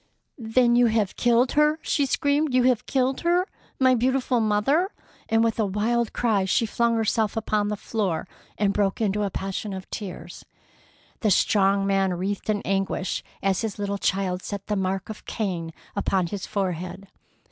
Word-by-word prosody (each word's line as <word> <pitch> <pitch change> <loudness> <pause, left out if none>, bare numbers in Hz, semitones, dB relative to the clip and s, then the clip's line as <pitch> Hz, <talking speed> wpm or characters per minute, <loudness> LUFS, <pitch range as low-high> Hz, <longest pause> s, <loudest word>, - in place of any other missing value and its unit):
"Then 240 +1 +3
you 245 0 +5
have 220 -3 0
killed 240 +1 +3
her!" 300 +1 +3
she 285 -2 +1
screamed. 285 +1 +1
"You 255 - +4
have 250 -3 +2
killed 260 0 0
her! 350 +2 +2 0.3
My 260 -1 +5
beautiful 255 0 +1
mother!" 225 - +2 0.4
and 225 0 +3
with 230 0 0
a 220 - +3
wild 225 +4 0
cry 220 -5 +1
she 190 +4 +2
flung 235 +2 +1
herself 220 -1 0
upon 215 -1 0
the 210 0 -2
floor 195 -7 -2 0.3
and 200 -1 +1
broke 200 -2 0
into 210 -2 0
a 205 - 0
passion 195 +2 -4
of 190 0 -7
tears. 195 -4 -7 0.8
The 220 - +1
strong 195 0 +3
man 195 -2 +1
writhed 195 +4 -3
in 210 -1 0
anguish 195 -1 -1 0.2
as 195 -1 +1
his 220 -3 -3
little 200 -1 -2
child 190 -2 0
set 200 0 -6
the 210 - -1
mark 190 0 -2
of 215 - -8
Cain 175 -7 -3 0.2
upon 195 -2 +1
his 190 +3 -5
forehead. 185 0 -3
210 Hz, 170 wpm, -25 LUFS, 195-240 Hz, 0.8 s, you